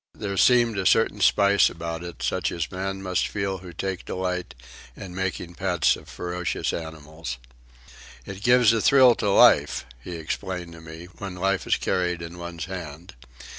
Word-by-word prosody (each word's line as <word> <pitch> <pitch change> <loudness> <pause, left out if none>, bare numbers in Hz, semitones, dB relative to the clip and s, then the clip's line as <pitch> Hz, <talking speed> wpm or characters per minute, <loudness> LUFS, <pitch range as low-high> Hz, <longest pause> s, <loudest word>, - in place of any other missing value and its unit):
There 100 -1 -4
seemed 120 -1 +4
a 95 - -2
certain 110 -2 +2
spice 100 +1 +4
about 85 0 -6
it, 85 -1 -8
such - - 0
as 85 -2 -3
men 95 +1 -4
must 90 -1 0
feel 100 -2 -3
who 90 -1 -10
take 95 +1 -4
delight 90 -1 -3 0.4
in 95 -3 -9
making 95 -2 -3
pets 90 -3 +1
of - - -14
ferocious 90 0 -3
animals. 80 -4 -6 0.9
"It 95 0 -8
gives 125 0 +5
a 115 - +1
thrill 130 -1 +6
to 105 - 0
life," 100 - +5 0.2
he 90 - -6
explained 85 +2 -5
to 80 - -12
me, 80 +1 -10
"when 95 -2 -6
life 95 0 -1
is - - +3
carried 90 -1 -1
in 85 +1 -9
one's 85 -2 -6
hand. 85 -1 -8
90 Hz, 170 wpm, -25 LUFS, 85-95 Hz, 0.9 s, thrill